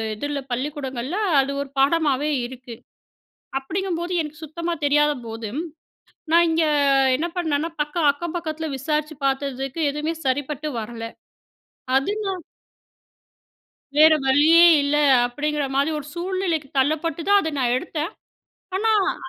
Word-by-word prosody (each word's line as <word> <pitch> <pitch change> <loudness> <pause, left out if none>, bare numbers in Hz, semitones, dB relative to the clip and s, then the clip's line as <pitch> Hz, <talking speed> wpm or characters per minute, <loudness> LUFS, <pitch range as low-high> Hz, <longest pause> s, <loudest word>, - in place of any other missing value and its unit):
இதில 290 +5 -3
பள்ளிக்கூடங்கள்ல 265 +1 -3 0.2
அது 270 +1 +1
ஒரு 280 - -6
பாடமாவே 290 0 +2 0.2
இருக்கு. 245 -1 -9 0.8
அப்பிடிங்கம்போது 345 +4 -3
எனக்கு 300 0 -7
சுத்தமா 335 +3 -4
தெரியாதபோது 280 -6 0 0.8
நான் 340 +1 +6
இங்கே 320 -1 +2 0.5
என்ன 315 +6 -1
பண்ணன்னா, 320 -2 0
பக்க, 295 +2 -4 0.2
அக்கம் 340 +4 -6
பக்கத்தில 320 -1 -4
விசாரிச்சு 305 +3 -2
பார்த்ததுக்கு 270 +2 -2
எதுமே 300 +3 -2
சரிப்பட்டு 285 +3 -1
வரல. 225 +1 -7 0.9
அது 270 +8 +1
நான் 380 -3 -3 1.6
வேற 315 +1 +8
வழியே 305 +6 +6 0.2
இல்ல 285 +1 +1 0.3
அப்பிடிங்கிற 295 +4 -2
மாதிரி 280 +3 +2
ஒரு 285 - -9
சூழ்நிலைக்கு 350 -4 -2
தள்ளப்பட்டு 310 +4 0
தான் 405 0 +6
அத 320 - -3
நான் 245 -2 +2
எடுத்தேன். 320 +3 -4 0.7
ஆனா 445 +3 +1 0.2
அ. - - -9
295 Hz, 120 wpm, -23 LUFS, 270-330 Hz, 1.6 s, வேற